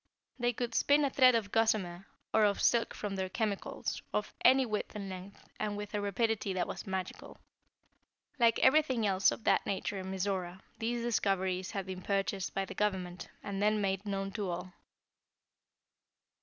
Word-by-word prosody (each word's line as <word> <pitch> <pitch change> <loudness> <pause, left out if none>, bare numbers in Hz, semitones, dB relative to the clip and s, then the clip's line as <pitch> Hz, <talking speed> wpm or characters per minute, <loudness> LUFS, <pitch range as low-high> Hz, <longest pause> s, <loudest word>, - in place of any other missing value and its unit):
They 240 0 +2
could 240 0 -3
spin 285 +4 +4
a 275 - 0
thread 255 -2 +6
of 210 -3 -1
gossamer, 195 -5 +1 0.3
or 220 - +5
of 205 -1 +3
silk 235 -1 +2
from 205 -2 -4
their 190 -1 -2
chemicals, 210 -1 -2
of 210 - -2
any 265 0 +6
width 215 -2 -3
and 200 -2 -4
length, 185 +1 -9
and 210 -1 -2
with 205 0 -6
a 205 - 0
rapidity 205 0 0
that 185 -1 -1
was - - -6
magical. 190 -1 -5 1.0
Like 230 -1 +5
everything 260 -5 +4
else 195 -1 +4
of - - -6
that - - +3
nature 200 0 -2
in 190 0 -6
Mizora, 190 -1 -2 0.2
these 235 +1 -1
discoveries 190 -5 0
had 195 -2 -3
been 185 -1 -6
purchased 195 0 -1
by 195 - 0
the - - -8
Government, 185 -4 -2
and 200 -1 -3
then 210 +1 +3
made 195 -1 0
known 195 -1 -2
to 200 -2 -3
all. 180 +1 -5
200 Hz, 170 wpm, -32 LUFS, 190-225 Hz, 1.0 s, thread